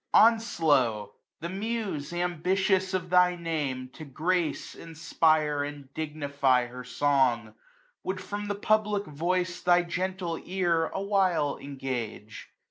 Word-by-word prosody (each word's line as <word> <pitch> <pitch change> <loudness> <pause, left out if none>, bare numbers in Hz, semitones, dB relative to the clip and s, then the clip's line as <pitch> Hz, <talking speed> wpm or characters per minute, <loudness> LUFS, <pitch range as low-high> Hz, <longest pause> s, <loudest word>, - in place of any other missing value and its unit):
Onslow! 155 - +3 0.3
the 170 - -4
Muse, 200 -6 -3
am])itious 185 +2 +1
of 180 -1 -3
thy 180 0 +5
name, 150 -7 -3
To 160 - -9
grace, 160 +4 -1
inspire, 155 -2 +1
and 145 -2 -8
dignify 140 -5 +1
her 125 +1 -9
song, 125 -2 +2
10 110 0 -16 0.5
Would 185 0 -2
from 205 +2 -5
the 205 - -1
PubUc 210 0 +1
Voice 180 +3 -1
thy 175 0 +4
gcmtle 180 -1 -3
ear 175 -3 +1
A 195 - -4
while 185 -8 +1
engage. 125 -6 -6
165 Hz, 125 wpm, -28 LUFS, 140-185 Hz, 0.5 s, thy